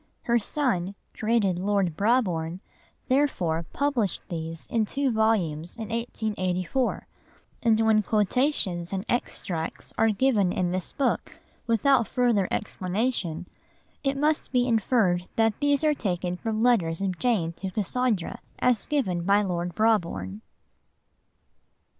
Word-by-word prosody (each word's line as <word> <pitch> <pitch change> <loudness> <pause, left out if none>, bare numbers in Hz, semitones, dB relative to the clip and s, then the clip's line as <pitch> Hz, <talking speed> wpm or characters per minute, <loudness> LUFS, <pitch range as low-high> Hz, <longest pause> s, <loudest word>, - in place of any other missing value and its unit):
Her 235 0 +2
son, 205 -7 -1 0.2
created 215 -5 +1
Lord 195 -4 +1
Brabourne, 185 -6 +1 0.5
therefore 180 - +1
published 260 -9 0
these 165 -1 -5
in 225 -2 0
two 270 +5 0
volumes 190 -8 0
in 220 -2 -6
1884, 220 -1 -1 0.6
and 225 -2 +3
when 220 -1 +4
quotations 210 - +1
and 195 +2 -2
extracts 175 -8 -3
are 225 - +5
given 210 -4 +2
in 180 -1 0
this 185 -1 -2
book 275 - -1 0.3
without 235 +1 +3
further 235 -7 +2
explanation, 185 -4 -2 0.6
it 275 -1 0
must 300 +2 +1
be 250 -1 +2
inferred 215 -6 +2
that 225 -2 +2
these 285 0 +2
are 305 -1 +4
taken 180 -7 -2
from 220 +3 -2
letters 180 -10 +3
of 185 -3 -2
Jane 200 -10 +1
to 190 +3 -5
Cassandra, 210 0 -1 0.2
as 250 -4 +2
given 225 - 0
by 200 +3 +3
Lord 175 -2 -2
Brabourne. 165 - 0
210 Hz, 125 wpm, -26 LUFS, 180-240 Hz, 0.6 s, are